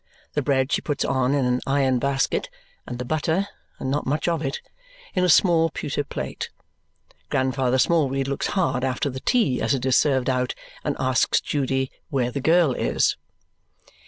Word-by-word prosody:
The 150 - +1
bread 135 -1 +1
she - - +1
puts 145 - -1
on 130 0 +1
in 135 -3 +1
an 125 0 +1
iron 135 -2 +2
basket, 135 +1 0 0.4
and 120 - -5
the 125 - -4
butter 160 +7 0 0.3
(and 130 - -3
not 145 - -1
much 150 +5 0
of 165 -2 0
it) 135 -1 -2 0.5
in 185 - +1
a 180 - +3
small 165 -1 +5
pewter 145 -2 -3
plate. - - -5 0.8
Grandfather 130 -1 +1
Smallweed 135 -3 +2
looks 140 - -1
hard 130 -9 +1
after 130 +2 -1
the 130 - -6
tea 220 - +1
as - - +2
it 130 -1 -3
is 130 -1 +3
served 135 -4 +2
out 125 -1 0 0.3
and 145 - -1
asks 130 -1 +2
Judy 135 -2 -1 0.2
where 125 -3 0
the 140 - -3
girl 160 -1 +4
is. - - +1
135 Hz, 175 wpm, -24 LUFS, 130-150 Hz, 0.8 s, small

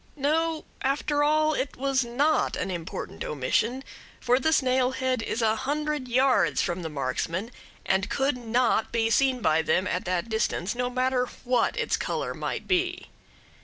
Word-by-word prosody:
No, 315 +2 0 0.2
after 290 +2 +1
all, 310 +1 +3
it 275 -1 -3
was 270 0 +1
not 275 +7 +1
an 190 - -3
important 170 -2 -5
omission; 215 - 0 0.4
for 250 +1 +2
this 315 +1 +2
nail 255 0 +2
head 260 -2 -1
is 225 +1 -2
a 220 0 +3
hundred 295 +2 -2
yards 255 +2 +3
from 180 0 -1
the 165 - -4
marksmen, 160 - -3 0.3
and 190 +2 +1
could 275 0 +1
not 240 -1 +1
be 225 -1 +1
seen 260 +1 +2
by 160 -4 +3
them 185 +4 +1
at 180 -1 -2
that 180 +3 -1
distance, 220 -4 -1
no 245 0 -1
matter 255 0 0 0.2
what 250 -1 +1
its - - 0
color - - -2
might - - -4
be. 365 0 0
250 Hz, 165 wpm, -26 LUFS, 220-275 Hz, 0.4 s, all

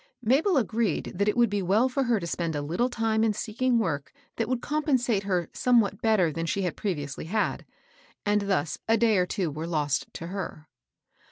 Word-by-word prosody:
Mabel 290 - +3
agreed 225 -3 0
that 200 +3 0
it 210 - -1
would 235 -3 +4
be 205 -1 0
well 200 +7 +3
for 265 +1 -1
her 235 -3 +2
to 170 - -5
spend 165 -1 -2
a 145 - -2
little 175 +12 0
time 225 -2 0
in 220 -2 +2
seeking 235 +4 0
work 165 -10 -1 0.3
that 225 0 -1
would 255 -1 0
compen 295 0 +1
sate 235 -5 0
her 180 -4 0
somewhat 235 -5 +2
better 210 -7 +3
than 165 +2 -3
that - - -3
she 200 - 0
had 180 -3 -2
pre 195 -4 -1
viously 145 +1 -6
had; 215 +5 -1 0.6
and 205 -1 +1
thus 160 -5 0
a 225 +1 +4
day 225 -2 +3
or 180 0 +2
two 180 -6 -1
were 155 +3 -5
lost 150 -5 -1
to 165 - -6
her. 180 -6 -6
205 Hz, 215 wpm, -27 LUFS, 170-235 Hz, 0.6 s, would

